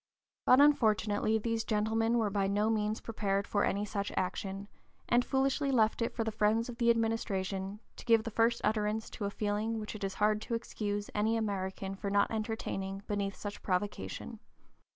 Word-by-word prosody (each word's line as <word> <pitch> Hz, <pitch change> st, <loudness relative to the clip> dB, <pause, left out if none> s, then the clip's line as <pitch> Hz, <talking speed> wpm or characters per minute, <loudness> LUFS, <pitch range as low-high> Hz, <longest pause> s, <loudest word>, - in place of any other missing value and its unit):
But 255 Hz, -, +7 dB
unfortunately 220 Hz, -6 st, +3 dB
these 225 Hz, +1 st, -1 dB
gentlemen 225 Hz, +2 st, +1 dB
were 215 Hz, -3 st, +1 dB
by 195 Hz, -1 st, +1 dB
no 205 Hz, +3 st, +2 dB
means 215 Hz, 0 st, 0 dB
prepared 200 Hz, -3 st, -1 dB
for 205 Hz, -, +1 dB
any 200 Hz, +1 st, 0 dB
such 200 Hz, -1 st, -3 dB
action, 195 Hz, +2 st, -2 dB, 0.4 s
and 240 Hz, +1 st, +4 dB
foolishly 275 Hz, +2 st, +1 dB
left 225 Hz, -2 st, +3 dB
it 230 Hz, -, 0 dB
for 225 Hz, -, -2 dB
the 220 Hz, -, -2 dB
friends 220 Hz, +2 st, +1 dB
of 235 Hz, -, -8 dB
the 235 Hz, -1 st, +3 dB
administration 205 Hz, -4 st, 0 dB, 0.2 s
to -, -, -10 dB
give 230 Hz, -2 st, +5 dB
the 230 Hz, -, -5 dB
first 230 Hz, +2 st, +2 dB
utterance 215 Hz, +1 st, 0 dB
to 205 Hz, -, -4 dB
a -, -, 0 dB
feeling 210 Hz, +2 st, -1 dB
which 210 Hz, -, -5 dB
it 215 Hz, -, -7 dB
is 195 Hz, 0 st, -2 dB
hard 210 Hz, 0 st, +2 dB
to 230 Hz, -, -2 dB
excuse 205 Hz, -3 st, -3 dB
any 220 Hz, +2 st, +1 dB
American 195 Hz, -2 st, -3 dB
for 200 Hz, +1 st, -4 dB
not 200 Hz, 0 st, +2 dB
entertaining 205 Hz, -3 st, -3 dB
beneath 200 Hz, -1 st, -2 dB
such 205 Hz, 0 st, -7 dB
provocation. 180 Hz, -, -3 dB
215 Hz, 180 wpm, -32 LUFS, 200-225 Hz, 0.4 s, But